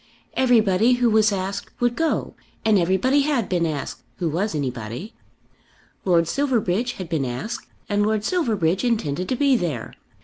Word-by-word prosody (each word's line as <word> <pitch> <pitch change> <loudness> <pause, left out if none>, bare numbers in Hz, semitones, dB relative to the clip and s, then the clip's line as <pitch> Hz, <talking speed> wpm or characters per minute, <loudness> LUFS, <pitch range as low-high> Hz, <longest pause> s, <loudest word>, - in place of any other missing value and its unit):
Everybody 230 -3 +4
who 245 -2 +2
was 215 0 +4
asked 195 +1 -4
would 240 0 +1
go, 325 -1 0 0.3
and 215 -3 +5
everybody 190 +11 +2
had 275 -7 0
been 175 -2 +1
asked, 150 -3 -4 0.2
who 170 -3 -1
was 180 +5 -1
anybody. 125 - -4 0.9
Lord 170 -3 +3
Silverbridge 245 - 0
had 185 -6 -7
been 160 -4 -1
asked, 130 - -4 0.2
and 205 0 +1
Lord 215 0 +1
Silverbridge 215 - +1
intended 185 - -1
to 255 - +1
be 275 0 +3
there. 160 - -2
205 Hz, 150 wpm, -23 LUFS, 170-240 Hz, 0.9 s, and